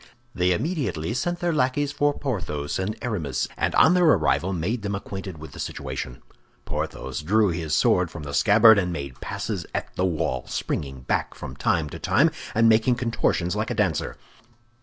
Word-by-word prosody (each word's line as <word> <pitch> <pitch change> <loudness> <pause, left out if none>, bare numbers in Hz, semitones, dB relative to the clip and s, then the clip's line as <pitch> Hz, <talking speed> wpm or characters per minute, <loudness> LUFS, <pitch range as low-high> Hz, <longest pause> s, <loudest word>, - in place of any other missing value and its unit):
They 90 0 +2
immediately 120 - -1
sent 175 +8 -2
their 175 -1 +1
lackeys 140 0 +1
for 145 0 +1
Porthos 80 - -3
and 105 +4 -2
Aramis, 85 - -2
and - - -1
on 160 - +6
their 180 -1 +4
arrival 95 - +3
made 95 +7 -2
them 100 0 -2
acquainted 95 -3 -6
with 80 +1 -10
the - - -11
situation. - - -5 0.4
Porthos 65 +2 -4
drew 105 +6 +3
his 80 -3 -1
sword 90 -2 +3
from 80 -2 -8
the 70 -1 -6
scabbard, 105 +9 +6
and 90 -2 -1
made 70 -5 -6
passes - - -3
at - - -4
the 90 - +1
wall, 80 -8 -1
springing 65 -2 -3
back 65 - -1
from - - -8
time 80 -3 +1
to - - -7
time, - - +3 0.2
and 115 +1 +5
making 115 +2 +4
contortions 115 -7 0
like 110 +2 -1
a 120 - -2
dancer. 95 -9 0
95 Hz, 180 wpm, -24 LUFS, 80-120 Hz, 0.4 s, on